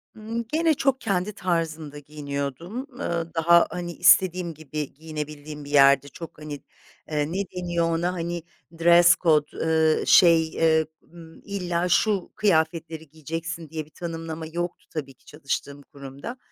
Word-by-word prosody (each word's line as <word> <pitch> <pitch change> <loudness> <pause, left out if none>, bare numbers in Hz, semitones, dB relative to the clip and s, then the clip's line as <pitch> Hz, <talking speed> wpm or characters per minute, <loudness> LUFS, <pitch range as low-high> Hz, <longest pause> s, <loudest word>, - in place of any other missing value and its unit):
Imm, 225 +2 -4
gene 325 0 +3
çok 270 -2 0
kendi 200 -2 -1
tarzımda 160 -5 -2
giyiniyordum. 145 - -5
Iıı, 170 -7 -3
daha, 170 +1 +5
hani, 175 -1 -5
istediğim 180 -1 +4
gibi 150 -1 -6
giyinebildiğim 150 -1 -7
bir - - -10
yerdi. 140 -1 +5
Çok, 165 +3 -10
hani, 150 -1 -7 0.6
eee, 150 0 -1
ne 185 - -2 0.2
deniyor 175 -2 0
ona, 175 +2 0
hani, 170 -1 -4 0.4
dress 170 +1 +7
code, 155 -4 +2
ııı, 160 -1 +2
şey, 165 -2 +6
ııı, 160 -1 +4 0.2
ımm, 165 -1 -15
illa 180 -3 -2
şu 205 -1 +2
kıyafetleri 160 -4 0
giyeceksin 165 +2 -6
diye 155 -1 -5
bir - - -22
tanımlama 165 -1 -6
yoktu 175 +2 -5
tabii 140 -4 -5
ki - - -33
çalıştığım 145 -1 -5
kurumda. 140 - -9
165 Hz, 140 wpm, -25 LUFS, 150-175 Hz, 0.6 s, dress